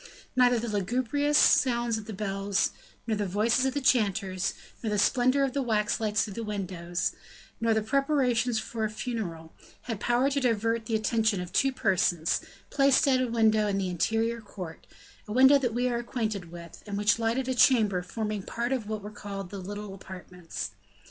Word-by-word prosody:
Neither 245 -1 +4
the 235 +1 -3
lugubrious 255 +8 +1
sounds 240 -3 +3
of 215 - -10
the - - -5
bells, 195 0 -1 0.3
nor 225 -1 0
the 205 -1 -2
voices 220 +7 +2
of 265 - -3
the 285 - 0
chanters, 200 -6 +1 0.3
nor 225 - -2
the 210 - 0
splendor 255 +5 +3
of 270 -2 0
the 280 - 0
wax 220 -3 0
lights 215 -1 +1
through 205 - -8
the 230 - -5
windows, 185 -4 -3 0.5
nor 230 -1 +2
the 220 - +1
preparations 255 -2 +1
for 220 0 -2
the - - -9
funeral, 175 -11 -5 0.3
had 225 -5 -4
power 245 +5 +2
to 280 - +1
divert 230 -2 0
the 225 - 0
attention 220 -2 +1
of 180 -1 -6
two 270 - +3
persons, 185 -8 +1 0.3
placed 275 -1 +4
at 260 -2 +3
a 255 - 0
window 220 -2 +3
of 200 -1 0
the 190 -2 -1
interior 225 +6 0
court 185 -6 -9 0.4
a - - -7
window 265 +4 +6
that 245 -4 -1
we 245 +1 +1
are 240 -1 0
acquainted 215 -7 -3
with, 170 -1 -11
and 200 -1 -3
which 210 +2 +2
lighted 235 +3 0
a 260 - 0
chamber 220 -8 +4
forming 210 +2 -4
part 235 +5 -3
of 240 -6 -2
what 215 -2 -4
were 210 - -7
called 200 -3 -7
the 200 - -6
little 205 +1 -6
apartments. 180 -2 -8
220 Hz, 190 wpm, -28 LUFS, 200-245 Hz, 0.5 s, window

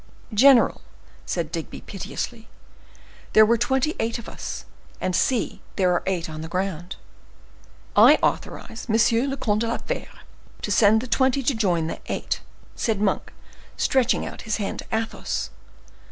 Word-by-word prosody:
"General," 255 +3 +6 0.5
said 165 -3 -2
Digby, 165 -2 -5
piteously, 220 +3 -6 0.9
"there 215 - +8
were 230 +2 +4
twenty 265 +6 +1
eight 225 +1 0
of 235 - -9
us, - - -6 0.3
and 185 - -1
see, 245 +5 0
there 185 -3 +3
are 175 - +1
eight 180 -3 -1
on 155 -1 -7
the 160 - -5
ground." 180 0 -3 1.0
"I - - +8
authorize 225 - -3
M. 230 +3 +3
le 270 - -3
Comte 210 -4 0
de 230 - 0
la 230 - -1
Fere - - -4 0.5
to 210 - -2
send 215 +1 +5
the 255 - -6
twenty 265 +2 +2
to 270 - +2
join 180 -8 +1
the 165 - -4
eight," - - -2 0.3
said 220 -4 0
Monk, 205 -2 0 0.5
stretching 260 -2 +2
out - - -7
his 215 -1 -2
hand 205 -3 -3
to - - -6
Athos. 225 0 -2
220 Hz, 155 wpm, -24 LUFS, 185-235 Hz, 1.0 s, there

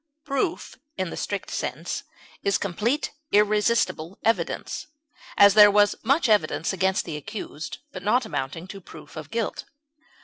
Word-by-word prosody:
Proof 300 +4 -2 0.2
in 185 -3 -2
the - - -5
strict 200 -2 -4
sense - - -3 0.4
is 200 - +2
complete, 220 - -1 0.2
irresistible 210 -4 +2
evidence; 225 +1 -1 0.5
as, 200 -1 +8
there 210 0 +9
was 205 0 +4
much 275 +6 +2
evidence 185 -5 +2
against 190 +1 +1
the 160 -3 -4
accused, 175 -4 -6
but 185 - -7
not 225 +5 +2
amounting 145 -1 -4
to 195 0 -8
proof 155 -3 -13
of 155 -2 -7
guilt. 230 -2 -3
200 Hz, 140 wpm, -25 LUFS, 170-220 Hz, 0.5 s, there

